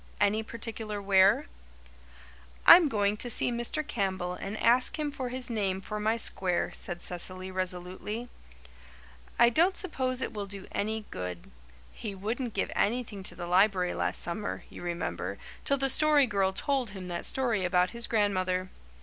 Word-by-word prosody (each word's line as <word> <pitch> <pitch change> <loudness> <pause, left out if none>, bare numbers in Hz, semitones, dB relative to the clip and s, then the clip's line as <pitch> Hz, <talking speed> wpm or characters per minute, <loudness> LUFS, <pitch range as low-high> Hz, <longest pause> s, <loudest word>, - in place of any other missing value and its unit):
"Any 205 +1 +2
particular 220 -2 -5
where?" 195 0 +4 1.2
"I'm 340 -4 +9
going 205 -3 +1
to 245 - -3
see 240 - +2
Mr. 240 +6 -1
Campbell 190 -8 -2
and 195 +3 -6
ask 245 +6 +3
him 300 -1 -2
for 260 -3 -4
his 255 0 -2
name 200 -5 -1
for 210 +2 -5
my 220 +2 +1
square," 185 -5 +1
said 175 -1 -4
Cecily 185 +1 -2
resolutely. 185 +5 -3 1.1
"I 235 0 +6
don't 345 +8 +3
suppose 260 -8 -2
it - - -4
will 205 -2 -4
do 195 -1 -8
any 215 +1 -2
good. 90 -5 -6 0.4
He 205 -3 -6
wouldn't 225 +5 -3
give 195 - -1
anything 220 -3 -1
to 190 - -2
the 175 - -6
library 185 0 +3
last - - -1
summer, 190 +4 -4
you - - -10
remember, 100 - -3 0.3
till 280 - +2
the 270 0 +1
Story 300 0 +5
Girl 200 -4 +1
told 260 +4 -1
him 190 -2 -8
that 170 -1 -4
story 235 -7 0
about 180 0 +2
his 235 0 -1
grandmother. 185 -4 0
205 Hz, 160 wpm, -29 LUFS, 185-240 Hz, 1.2 s, I'm